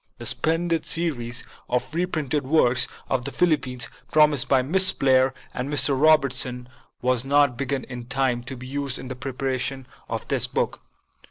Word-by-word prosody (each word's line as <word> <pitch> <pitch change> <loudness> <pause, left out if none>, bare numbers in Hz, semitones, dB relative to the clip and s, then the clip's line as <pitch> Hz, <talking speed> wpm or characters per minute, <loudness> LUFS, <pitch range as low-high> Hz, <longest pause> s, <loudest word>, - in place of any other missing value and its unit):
The - - -8
splendid 165 0 0
series 125 -8 -1 0.3
of 125 +4 -1
reprinted 155 -5 -1
works 130 -3 +3 0.2
on 130 - 0
the 140 +3 -4
Philippines, 130 -9 0 0.2
promised 150 -3 +4
by 130 -2 +4
Miss 185 +7 +4
Blair 130 -1 +3 0.2
and 130 +3 -4
Mr. 140 -1 +3
Robertson, 130 -4 +2 0.4
was 125 -1 +2
not 140 -1 +3
begun 135 +1 -2
in 125 -2 -8
time 130 -2 0
to 130 +1 -6
be 125 - -9
used 140 0 -3
in 130 - -8
the 130 - -4
preparation 130 0 -3 0.2
of - - -4
this - - +1
book. - - -2
135 Hz, 160 wpm, -24 LUFS, 125-150 Hz, 0.4 s, promised